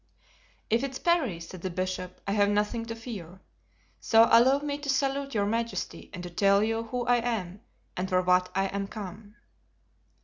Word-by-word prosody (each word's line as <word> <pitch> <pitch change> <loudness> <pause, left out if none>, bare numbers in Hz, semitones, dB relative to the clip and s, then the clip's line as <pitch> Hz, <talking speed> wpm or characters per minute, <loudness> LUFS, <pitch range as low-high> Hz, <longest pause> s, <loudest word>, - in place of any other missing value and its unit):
"If 230 +3 +3
it's 270 -1 -3
Parry," 315 - +1
said 170 +1 -9
the 185 - -3
bishop, 185 0 -4
"I - - 0
have 205 0 +3
nothing 210 +3 0
to 230 - -4
fear; 195 -7 -8 0.6
so 225 0 +5
allow 250 +4 +6
me 285 0 -3
to 290 -1 -6
salute 275 0 0
your 200 -1 +2
majesty 230 +2 -3
and 180 -3 -7
to 175 - -6
tell 200 +3 +4
you 225 +1 -1
who 245 +1 -3
I 245 0 +4
am 215 -5 -3 0.3
and 185 +1 -3
for 185 -1 +2
what 180 0 +3
I 195 0 +2
am 195 0 -3
come." 205 +1 -9
210 Hz, 180 wpm, -28 LUFS, 185-240 Hz, 0.6 s, allow